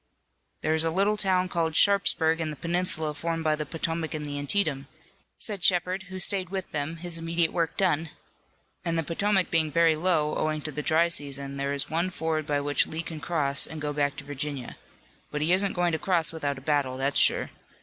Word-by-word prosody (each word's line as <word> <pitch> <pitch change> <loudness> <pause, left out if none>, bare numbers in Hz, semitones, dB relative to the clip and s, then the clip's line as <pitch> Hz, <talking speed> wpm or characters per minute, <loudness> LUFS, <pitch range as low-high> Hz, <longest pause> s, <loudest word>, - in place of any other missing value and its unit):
"There's 160 0 +2
a 165 - +1
little 200 +5 +2
town 185 -3 +2
called 165 -3 -1
Sharpsburg 165 -5 +4
in 160 - -2
the 150 - -5
peninsula 165 -1 0
formed 165 +2 -3
by 155 -1 +2
the 150 -1 -5
Potomac 165 0 -3
and 150 -1 -2
the 145 -1 -4
Antietam," 145 -3 0 0.5
said 205 -5 -2
Shepard, 185 +1 +2
who 190 - -6
stayed 185 0 +2
with 190 -1 -5
them, 155 +1 -3
his 170 0 +1
immediate 165 0 0
work 165 -2 -1
done, 165 -4 +1 0.7
"and 165 -1 -1
the 165 - +1
Potomac 190 +4 +1
being 160 -2 +2
very 165 0 +4
low, 155 -2 +1
owing 155 -1 -1
to 150 - -2
the 150 +1 -4
dry 160 +3 +3
season, 140 -4 -1
there 140 0 -2
is 140 0 -1
one 170 +3 0
ford 160 -3 -2
by 145 -1 +1
which 145 0 +1
Lee 160 +1 -4
can 160 -2 -7
cross 145 -3 0
and 160 - -8
go 150 0 -3
back 145 -1 0
to - - -7
Virginia. 145 -2 -5 0.5
But 150 - -4
he 160 +4 +3
isn't 195 +1 +2
going 175 -1 +1
to 160 - -1
cross 170 -3 +1
without 145 -4 -3
a - - -9
battle, 140 -3 0
that's 135 +1 +2
sure. - - +2
160 Hz, 210 wpm, -27 LUFS, 150-175 Hz, 0.7 s, Sharpsburg